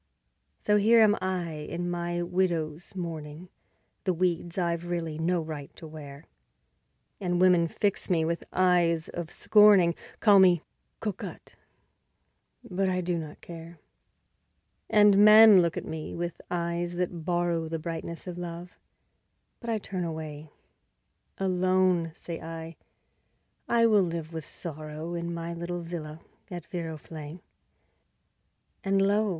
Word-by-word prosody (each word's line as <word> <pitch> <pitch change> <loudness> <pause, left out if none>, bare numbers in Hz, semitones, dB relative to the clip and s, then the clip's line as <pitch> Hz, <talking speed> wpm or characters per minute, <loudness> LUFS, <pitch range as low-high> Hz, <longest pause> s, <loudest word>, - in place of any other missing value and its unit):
So 210 0 +2
here 225 +3 +5
am 210 -1 +5
I 185 -3 -2
in 165 +3 -5
my 175 0 -2
widow's 175 -2 -2
mourning, 165 -1 -6 0.5
The 185 -3 0
weeds 175 0 -1
I've 170 -1 -1
really 165 -3 -3
no 175 +2 +1
right 150 -3 -7
to - - -11
wear; 150 -1 -10 0.9
And 175 -3 -1
women 180 -2 +5
fix 200 +5 -2
me 165 -3 +2
with 170 +1 -2
eyes 175 -3 +2
of 175 -2 -5
scorning, 205 -5 +5 0.3
Call 205 -3 +6
me 180 -3 +5 0.4
"cocotte", 210 -4 -6 1.1
but 190 +1 -1
I 185 0 0
do 175 0 -1
not 155 -2 -9
care. 170 0 -10 1.1
And 205 -1 +6
men 215 -1 +9
look 170 -2 -1
at - - -4
me 160 -1 -6
with 170 0 -4
eyes 175 0 -2
that 175 -2 -3
borrow 175 -1 0
The 165 +1 -3
brightness 165 +1 -6
of 180 -1 -6
love, 175 0 -8 0.8
but 235 - -7
I 225 - +1
turn 190 -3 -4
away; 155 -2 -6 0.9
Alone, 185 -2 +2
say 170 -2 -7
I, 165 0 -7 0.9
I 235 -1 +4
will 215 -3 +5
live 165 -2 -3
with 160 -1 -6
Sorrow, 155 0 -7
In 170 0 -3
my 170 0 -4
little 170 +1 -4
villa 165 -2 -7 0.3
at 175 -4 -7
Viroflay. 160 -1 -7 1.4
And 195 0 +2
lo! 205 +2 +2
175 Hz, 135 wpm, -28 LUFS, 165-185 Hz, 1.4 s, men